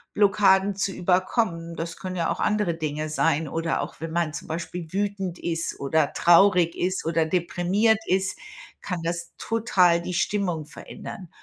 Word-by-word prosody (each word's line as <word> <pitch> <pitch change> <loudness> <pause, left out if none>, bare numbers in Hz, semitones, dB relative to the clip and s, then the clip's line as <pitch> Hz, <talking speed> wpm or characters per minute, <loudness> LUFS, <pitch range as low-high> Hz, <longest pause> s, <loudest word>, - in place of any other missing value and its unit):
Blockaden 200 -1 +4
zu 195 0 -1
überkommen. 180 -2 0
Das 165 +1 -5
können 185 -1 -6
ja 170 -2 0
auch - - -3
andere 210 -5 +1
Dinge 155 -1 -3
sein. 155 0 +1
Oder 165 +3 -1
auch - - -6
wenn 165 0 -5
man 165 -2 0
zum - - -7
Beispiel 165 0 -5
wütend 195 -3 -2
ist 165 -1 -2
oder 145 +1 +1
traurig 175 0 +5
ist 185 -1 -1
oder 165 -1 +1
deprimiert 185 +5 +1
ist, 190 +1 +1 0.5
kann 180 -3 -4
das 170 0 -3
total 185 -7 +2
die 180 - -5
Stimmung 180 -5 -1
verändern. 170 +3 -9
175 Hz, 160 wpm, -25 LUFS, 165-195 Hz, 0.5 s, traurig